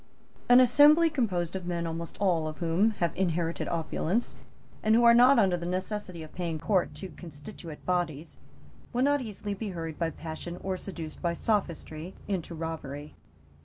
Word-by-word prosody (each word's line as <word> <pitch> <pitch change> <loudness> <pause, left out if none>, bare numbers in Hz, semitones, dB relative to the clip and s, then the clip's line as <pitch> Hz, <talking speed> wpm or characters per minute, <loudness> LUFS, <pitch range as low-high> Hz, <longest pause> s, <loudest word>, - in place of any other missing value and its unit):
An 245 +1 +9
assembly 295 +6 +6
composed 190 - -1
of 185 -2 -5
men 170 -1 -2
almost 165 0 -5
all 175 -6 +2
of 155 0 -6
whom 170 +6 +2
have 170 -2 0
inherited 170 -2 -1
opulence, 170 +6 -1 0.5
and 220 +1 +4
who 240 - +5
are 235 0 +8
not 250 +3 +7
under 190 -5 +4
the 170 0 -4
necessity 185 -1 -3
of 155 - -12
paying 170 -3 -3
court 180 -2 0
to 185 +5 -6
constituent 160 0 -10
bodies, 170 -4 -2 0.5
will 245 +2 +2
not 285 0 +3
easily 210 -3 -5
be 205 +1 -4
hurried 165 -4 -5
by 165 -1 +1
passion 165 +2 -7
or 190 -1 -1
seduced 170 -5 -7
by 170 -1 0
sophistry 170 -4 -2
into 180 -4 -3
robbery. 155 -3 -6
175 Hz, 165 wpm, -29 LUFS, 165-210 Hz, 0.5 s, An